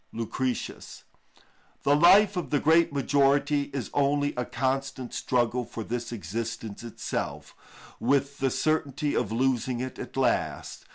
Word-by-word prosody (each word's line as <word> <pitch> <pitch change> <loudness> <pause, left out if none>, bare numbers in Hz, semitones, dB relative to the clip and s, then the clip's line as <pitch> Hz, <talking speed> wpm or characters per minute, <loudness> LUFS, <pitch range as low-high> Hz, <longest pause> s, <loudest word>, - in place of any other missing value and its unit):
_"—LUCR. 115 +3 -3
ii. 125 - +3
15. - - -8 0.8
The 145 - +4
life 190 +6 +6
of 180 - -3
the 145 - +2
great 160 +3 +4
majority 140 +1 +2
is 135 -5 -4
only 145 0 +1
a 125 - -2
constant 130 0 -2
struggle 125 0 0
for 115 -1 -7
this 120 +2 -4
existence 115 +1 -5
itself, 115 - -5 0.5
with 140 +3 +1
the 135 -1 +2
certainty 150 0 0
of 110 -4 0
losing 125 0 0
it 130 0 -5
at - - -7
last. - - -1
135 Hz, 140 wpm, -27 LUFS, 120-145 Hz, 0.8 s, life